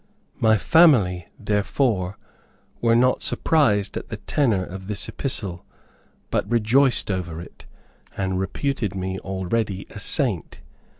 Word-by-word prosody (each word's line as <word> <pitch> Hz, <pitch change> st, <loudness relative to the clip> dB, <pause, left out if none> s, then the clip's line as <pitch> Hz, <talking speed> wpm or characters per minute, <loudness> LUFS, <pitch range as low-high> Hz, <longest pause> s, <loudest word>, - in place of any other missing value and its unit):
My 110 Hz, -3 st, +4 dB
family, 110 Hz, -, +4 dB
therefore, 105 Hz, -1 st, 0 dB, 0.6 s
were 115 Hz, -1 st, +4 dB
not 125 Hz, +2 st, +3 dB
surprised 105 Hz, -11 st, +1 dB
at -, -, -6 dB
the -, -, -5 dB
tenor 115 Hz, -10 st, 0 dB
of 95 Hz, +1 st, -9 dB
this 105 Hz, -1 st, -2 dB
epistle, 100 Hz, -10 st, -3 dB, 0.7 s
but -, -, -1 dB
rejoiced 120 Hz, +1 st, +3 dB
over 85 Hz, -3 st, -4 dB
it, 85 Hz, -, -12 dB, 0.5 s
and 95 Hz, -1 st, -1 dB
reputed 105 Hz, +1 st, -2 dB
me 95 Hz, 0 st, -3 dB
already 95 Hz, +1 st, -2 dB
a -, -, -8 dB
Saint. -, -, -1 dB
105 Hz, 120 wpm, -23 LUFS, 95-120 Hz, 0.7 s, My